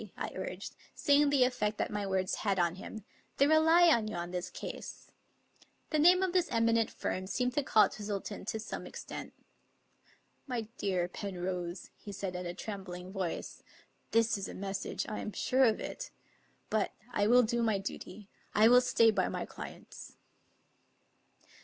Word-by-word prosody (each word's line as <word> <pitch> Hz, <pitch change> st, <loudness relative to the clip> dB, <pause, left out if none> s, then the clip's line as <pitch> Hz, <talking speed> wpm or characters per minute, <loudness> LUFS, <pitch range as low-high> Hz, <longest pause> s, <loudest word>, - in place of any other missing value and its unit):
"* -, -, -6 dB
I -, -, -3 dB
urged, -, -, -6 dB, 0.2 s
seeing 290 Hz, 0 st, +4 dB
the 280 Hz, -3 st, +4 dB
effect 230 Hz, -4 st, 0 dB
that -, -, -1 dB
my 205 Hz, -1 st, -2 dB
words 190 Hz, -1 st, 0 dB
had 200 Hz, -2 st, +1 dB
on 170 Hz, -2 st, +2 dB
him 215 Hz, +2 st, -8 dB, 0.2 s
" -, -, -39 dB
They 280 Hz, -, +5 dB
rely 320 Hz, +3 st, +6 dB
on 230 Hz, -8 st, +3 dB
you 215 Hz, -, -4 dB
in 175 Hz, 0 st, -4 dB
this 180 Hz, -1 st, -3 dB
case," -, -, -8 dB, 0.8 s
The 310 Hz, -, +2 dB
name 360 Hz, +4 st, +6 dB
of 370 Hz, -2 st, 0 dB
this 360 Hz, -2 st, +2 dB
eminent 230 Hz, -1 st, +2 dB
firm 185 Hz, 0 st, -3 dB
seemed 250 Hz, +5 st, 0 dB
to 290 Hz, -, +2 dB
calm 215 Hz, -6 st, +5 dB
Twistle 205 Hz, -1 st, -3 dB
ton 205 Hz, -, -6 dB
to 220 Hz, -, -2 dB
some 220 Hz, -, -6 dB
extent. -, -, -7 dB, 0.6 s
" -, -, -35 dB
My 235 Hz, -, 0 dB, 0.2 s
dear 185 Hz, -3 st, 0 dB
Penrose," 180 Hz, -2 st, -4 dB
he 205 Hz, -, -10 dB
said 190 Hz, -2 st, -4 dB
in 180 Hz, 0 st, -4 dB
a 175 Hz, -, -5 dB
trembling 185 Hz, -3 st, -7 dB
voice, 190 Hz, -4 st, -4 dB, 0.3 s
" -, -, -41 dB
this, 230 Hz, -2 st, +3 dB
is 195 Hz, -, -4 dB
a -, -, -8 dB
message; 195 Hz, 0 st, -3 dB
I 215 Hz, -, -4 dB
am 210 Hz, -, -5 dB
sure 260 Hz, +1 st, +3 dB
of 220 Hz, -3 st, +2 dB
it. -, -, -6 dB, 0.6 s
But 215 Hz, -2 st, +1 dB, 0.2 s
I 205 Hz, -2 st, +2 dB
will 245 Hz, +2 st, +6 dB
do 235 Hz, +1 st, 0 dB
my 220 Hz, -3 st, +2 dB
duty; 195 Hz, +1 st, -7 dB, 0.3 s
I 215 Hz, +2 st, +7 dB
will 250 Hz, +1 st, +8 dB
stay 235 Hz, -3 st, +4 dB
by -, -, +1 dB
my -, -, -3 dB
clients." -, -, -10 dB
215 Hz, 185 wpm, -32 LUFS, 190-250 Hz, 0.8 s, will